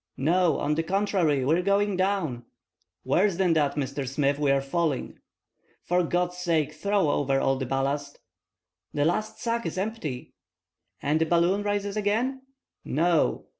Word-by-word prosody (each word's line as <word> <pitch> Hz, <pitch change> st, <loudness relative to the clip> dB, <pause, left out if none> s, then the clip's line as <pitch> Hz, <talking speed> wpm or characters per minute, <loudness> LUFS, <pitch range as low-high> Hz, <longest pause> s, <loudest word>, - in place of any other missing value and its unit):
"No. 165 Hz, +2 st, +2 dB
On 145 Hz, +1 st, 0 dB
the 160 Hz, -, 0 dB
contrary; 175 Hz, -6 st, +1 dB
we 145 Hz, -, +3 dB
are -, -, +1 dB
going 200 Hz, +1 st, +1 dB
down!" 185 Hz, -11 st, -1 dB, 0.6 s
"Worse 180 Hz, +8 st, +2 dB
than 180 Hz, -2 st, +2 dB
that, 150 Hz, -3 st, +1 dB
Mr. 135 Hz, -1 st, -3 dB
Smith, 140 Hz, +2 st, 0 dB
we 145 Hz, -2 st, +1 dB
are 135 Hz, 0 st, +4 dB
falling!" 140 Hz, 0 st, -2 dB, 0.6 s
"For 180 Hz, +1 st, +2 dB
God's 180 Hz, +1 st, -1 dB
sake 160 Hz, -4 st, 0 dB
throw 195 Hz, 0 st, +1 dB
over 135 Hz, -2 st, +1 dB
all 135 Hz, 0 st, +1 dB
the 130 Hz, -1 st, -4 dB
ballast!" 140 Hz, +2 st, -2 dB, 0.8 s
"The 145 Hz, 0 st, +2 dB
last 215 Hz, +6 st, -1 dB
sack 235 Hz, 0 st, -1 dB
is -, -, -5 dB
empty!" 185 Hz, -, -4 dB, 0.7 s
"And 150 Hz, +3 st, +1 dB
the 160 Hz, -, +2 dB
balloon 175 Hz, +4 st, +2 dB
rises 205 Hz, 0 st, -2 dB
again?" 230 Hz, +6 st, 0 dB, 0.4 s
"No!" 165 Hz, +2 st, +1 dB
165 Hz, 155 wpm, -26 LUFS, 145-195 Hz, 0.8 s, are